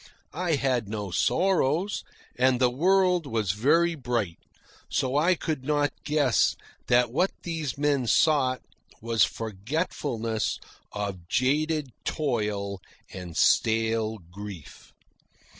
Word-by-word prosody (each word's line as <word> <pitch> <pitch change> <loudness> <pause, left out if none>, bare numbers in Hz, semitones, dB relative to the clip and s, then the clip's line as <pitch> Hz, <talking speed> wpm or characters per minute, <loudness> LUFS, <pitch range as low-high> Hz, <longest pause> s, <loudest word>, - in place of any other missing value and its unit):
I 175 -4 0
had 125 -6 0
no 105 -3 -4
sorrows, 180 - +1 0.3
and 125 0 +3
the 125 -1 +3
world 180 +3 +2
was 110 -7 0
very 155 - +3
bright, 120 - -2 0.5
so 130 +1 0
I 170 +5 +4
could 155 -5 -3
not 145 0 +1
guess 145 -6 +2 0.3
that 120 -1 +3
what 180 +9 +2
these 160 -6 -3
men 140 -3 +1
sought 130 -2 +3 0.4
was 115 -2 +2
forgetfulness 115 - -2 0.3
of 100 -4 -5
jaded 150 - +1
toil 105 - -2 0.3
and 90 -3 -7
stale 110 -1 +2
grief. 100 -5 -10
130 Hz, 110 wpm, -27 LUFS, 110-155 Hz, 0.5 s, I